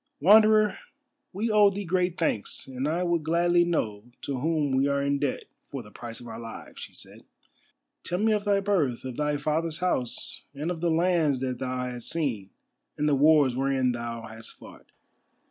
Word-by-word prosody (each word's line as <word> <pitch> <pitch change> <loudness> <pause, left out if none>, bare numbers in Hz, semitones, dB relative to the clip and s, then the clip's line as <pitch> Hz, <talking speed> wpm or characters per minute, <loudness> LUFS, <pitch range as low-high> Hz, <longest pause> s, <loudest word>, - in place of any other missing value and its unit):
"Wanderer, 215 +5 +5 0.5
we 215 +4 -2
owe 210 -1 +6
thee 200 +1 -5
great 180 0 0
thanks, 115 -11 -2
and 130 +1 -4
I 170 +4 0
would 170 -2 +1
gladly 175 +2 +3
know 110 -12 -2 0.2
to 135 -3 -3
whom 150 0 0
we 135 +1 +2
are 140 0 +1
in 140 0 0
debt 140 -2 -1 0.2
for 135 -4 -6
the 105 - -15
prices 115 +1 -8
of 120 - -10
our 115 - -7
lives," 115 -1 -9
she - - -8
said. - - -11 0.8
"Tell 180 - -2
me 220 +3 +2
of 210 -1 +1
thy 200 -1 +2
birth, 160 -13 0
of 130 -2 -5
thy 150 +1 0
father's 155 +2 -1
house, 150 -10 -2
and 150 +5 -3
of 165 -2 -5
the 175 - +1
lands 165 -4 +2
that 130 -2 -2
thou 130 -1 -2
hast 125 -1 -6
seen 125 - -2 0.5
and 150 - 0
the 150 - +3
wars 145 -2 +5
wherein 135 -1 +1
thou 115 -1 -5
hast 110 0 -10
fought. - - -15
150 Hz, 190 wpm, -27 LUFS, 125-175 Hz, 0.8 s, owe